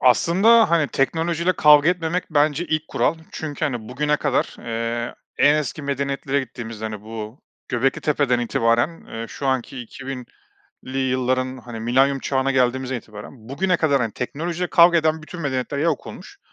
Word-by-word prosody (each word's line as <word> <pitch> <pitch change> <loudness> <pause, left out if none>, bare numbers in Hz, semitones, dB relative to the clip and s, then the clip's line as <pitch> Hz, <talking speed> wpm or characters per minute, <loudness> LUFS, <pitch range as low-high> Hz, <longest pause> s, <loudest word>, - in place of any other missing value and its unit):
Aslında 190 - +5
hani 160 -4 +3
teknolojiyle 165 +5 0
kavga 150 +1 +6
etmemek, 175 0 0
bence 150 +2 +2
ilk 155 -1 -2
kural 165 - +1 0.2
çünkü 155 -1 -4
hani 120 -7 -3
bugüne 150 +4 0
kadar, 145 -3 -1
eee, 115 0 -3 0.2
en 145 +1 +6
eski 150 0 -2
medeniyetlere 140 0 -1
gittiğimizde 115 -4 -7
hani 110 -2 -4
bu 110 +3 -8 0.3
Göbeklitepe'den 135 +1 +1
itibaren, 120 +6 +1
eee, 115 0 -6
şu 140 - -5
anki 130 0 -1
2000'li 130 +1 -9
yılların 130 0 0
hani 120 -2 -8
Milenyum 135 +4 +2
Çağı'na 135 0 0
geldiğimizden 130 0 +1
itibaren 110 +1 -11
bugüne 180 +7 +1
kadar 145 -4 +2
hani, 115 -3 -1
teknolojiyle 170 +7 -3
kavga 170 0 +6
eden 160 0 0
bütün 170 +3 -9
medeniyetler 140 -1 -2
ya 150 - 0
yok 160 -5 0
olmuş - - -11
135 Hz, 155 wpm, -22 LUFS, 125-155 Hz, 0.3 s, kavga